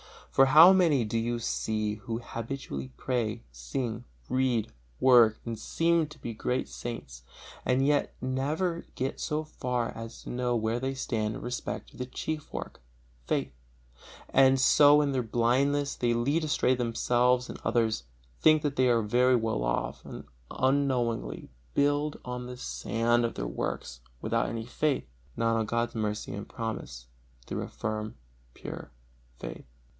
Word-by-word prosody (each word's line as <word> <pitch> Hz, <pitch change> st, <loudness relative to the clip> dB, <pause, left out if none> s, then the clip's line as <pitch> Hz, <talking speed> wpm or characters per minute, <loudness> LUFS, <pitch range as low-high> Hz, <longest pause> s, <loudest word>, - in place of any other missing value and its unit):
For 135 Hz, -, +6 dB
how 160 Hz, +7 st, +9 dB
many 165 Hz, -9 st, +4 dB
do 110 Hz, +2 st, -2 dB
you 120 Hz, +1 st, -1 dB
see 110 Hz, -2 st, -1 dB
who 115 Hz, +2 st, -5 dB
habitually 115 Hz, -, -5 dB
pray, 115 Hz, -3 st, -1 dB
sing, 115 Hz, -, -4 dB, 0.2 s
read, 130 Hz, -4 st, +1 dB, 0.3 s
work 120 Hz, -4 st, +6 dB
and 115 Hz, -2 st, -4 dB
seem 165 Hz, +4 st, +1 dB
to 150 Hz, +1 st, -13 dB
be 120 Hz, -, -6 dB
great 125 Hz, +3 st, -1 dB
saints, 65 Hz, -, -7 dB, 0.4 s
and 130 Hz, +1 st, +2 dB
yet 145 Hz, 0 st, +1 dB
never 150 Hz, +7 st, -1 dB
get 130 Hz, +2 st, -2 dB
so 155 Hz, 0 st, -1 dB
far 125 Hz, -5 st, -2 dB
as 115 Hz, 0 st, -8 dB
to -, -, -8 dB
know 125 Hz, 0 st, 0 dB
where 115 Hz, +1 st, 0 dB
they 135 Hz, +1 st, -2 dB
stand 110 Hz, -4 st, -2 dB
in -, -, -7 dB
respect 125 Hz, 0 st, -4 dB
of -, -, -16 dB
the 125 Hz, -, -3 dB
chief 155 Hz, +3 st, -5 dB
work, -, -, -6 dB, 0.5 s
faith; 70 Hz, 0 st, 0 dB, 0.8 s
and 135 Hz, 0 st, +5 dB
so 145 Hz, +3 st, +7 dB
in 145 Hz, -1 st, +1 dB
their 130 Hz, -2 st, +1 dB
blindness 135 Hz, +5 st, +1 dB
they 120 Hz, -1 st, +1 dB
lead 140 Hz, +7 st, +1 dB
astray 145 Hz, -3 st, +2 dB
themselves 125 Hz, +1 st, +2 dB
and -, -, -8 dB
others; 110 Hz, -, +1 dB, 0.3 s
think 155 Hz, -1 st, +5 dB
they 135 Hz, -3 st, +2 dB
are 115 Hz, -2 st, +3 dB
very 125 Hz, +4 st, +4 dB
well 110 Hz, -, 0 dB
off, -, -, -2 dB
and -, -, -8 dB
so 65 Hz, -2 st, -16 dB
unknowingly 125 Hz, -, 0 dB, 0.2 s
build 145 Hz, +1 st, +1 dB
on 125 Hz, 0 st, -5 dB
the 125 Hz, 0 st, -7 dB
sand 120 Hz, -1 st, 0 dB
of 115 Hz, -, -1 dB
their -, -, -3 dB
works -, -, -4 dB, 0.2 s
without -, -, 0 dB
any 115 Hz, -1 st, -4 dB
faith, 145 Hz, +3 st, 0 dB, 0.3 s
not 115 Hz, 0 st, +2 dB
on 110 Hz, -, +1 dB
God's 115 Hz, +1 st, 0 dB
mercy 105 Hz, -2 st, -2 dB
and 100 Hz, +1 st, -6 dB
promise 70 Hz, -, -5 dB, 0.4 s
through -, -, -3 dB
a -, -, -4 dB
firm, 110 Hz, 0 st, -4 dB, 0.4 s
pure -, -, -8 dB, 0.5 s
faith. -, -, -8 dB
120 Hz, 155 wpm, -29 LUFS, 110-135 Hz, 0.8 s, how